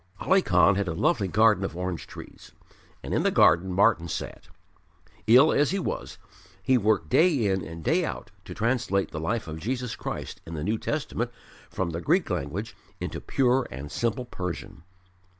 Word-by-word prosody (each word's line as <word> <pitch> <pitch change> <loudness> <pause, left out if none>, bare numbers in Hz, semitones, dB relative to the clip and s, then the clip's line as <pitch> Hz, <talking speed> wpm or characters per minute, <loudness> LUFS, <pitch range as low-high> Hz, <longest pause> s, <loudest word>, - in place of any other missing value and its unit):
Ali 190 +2 +3
Khan 95 - +4
had 100 -1 -1
a 80 - -2
lovely 125 - +1
garden 105 +1 +3
of 95 - -4
orange 90 -1 -4
trees, - - -12 0.5
and - - -4
in - - +2
the - - +2
garden 85 +4 +4
Martyn 95 -2 +3
sat. - - -6 0.8
Ill 130 +7 +7
as 145 -1 +3
he 195 - -1
was, 190 - -4 0.5
he 130 - +3
worked 105 -7 +2
day 155 - +3
in 95 -2 0
and 80 0 -8
day - - +2
out - - -5
to - - -8
translate 115 -5 0
the 75 - -5
life 100 +6 -2
of 80 0 -6
Jesus 125 +4 -3
Christ - - -6
in 80 - -8
the 75 - -4
New 110 +5 -1
Testament 130 -5 -2 0.4
from 90 -2 -3
the 85 +1 -4
Greek - - +1
language 95 +11 -4 0.2
into - - -5
pure 130 0 +1
and 70 +2 -8
simple 120 +1 -1
Persian. 90 -8 -6
100 Hz, 180 wpm, -26 LUFS, 85-125 Hz, 0.8 s, Ill